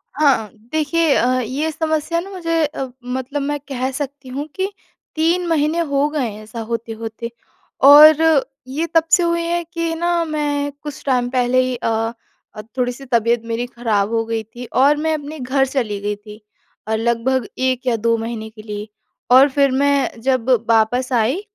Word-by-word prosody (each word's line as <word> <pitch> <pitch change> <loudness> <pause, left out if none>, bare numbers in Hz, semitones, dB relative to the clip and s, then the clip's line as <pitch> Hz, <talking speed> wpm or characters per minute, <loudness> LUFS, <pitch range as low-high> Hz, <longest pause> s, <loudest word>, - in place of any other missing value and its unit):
हाँ, 275 -8 +2 0.2
देखिए 315 0 +2
अ, 255 +1 +2
ये 280 +7 -2
समस्या 315 +1 -1
ना 385 +3 -7
मुझे 330 -4 -1
अ, 275 -3 -4 0.2
मतलब 260 +3 -3
मैं 290 +1 -2
कह 260 -1 -2
सकती 275 -1 -6
हूँ 285 +4 -4
कि 385 +2 -2 0.4
3 340 +3 +1
महीने 320 +1 +1
हो 285 -3 +1
गए 280 -6 -1
हैं, 210 +1 -9
ऐसा 220 +2 -8
होते-होते 230 0 -5 0.6
और 300 +2 +10 0.5
ये 300 +6 -2
तब 325 - +6
से 355 - +5
हुई 340 0 +1
है 345 0 -1
कि 335 -1 -1
ना, 345 0 +1
मैं 290 -2 -1
कुछ 295 -2 -7
टाइम 250 -2 +1
पहले 255 0 +2
ही 255 0 -2
अ 225 -1 -1 0.4
अ, 215 - -6 0.2
थोड़ी-सी 250 +2 -2
तबीयत 235 -1 +2
मेरी 230 +1 -2
खराब 220 -4 -1
हो 225 0 +1
गई 225 -1 -2
थी 240 +3 -10
और 280 +3 +5
मैं 315 +1 0
अपने 300 0 -5
घर 270 +2 +1
चली 235 -7 -2
गई 205 0 -2
थी 210 +1 -13 0.5
और 220 0 0
लगभग 235 +2 0
1 260 0 0
या 235 - +3
2 230 +1 +1
महीने 225 -1 -5
के 215 -1 -13
लिए 210 0 -6 0.4
और 270 +3 +8
फिर 275 0 +2
मैं 275 -3 +1
जब 260 -1 0 0.2
वापस 235 +4 +2
आई, 245 - +1
260 Hz, 180 wpm, -19 LUFS, 230-300 Hz, 0.6 s, और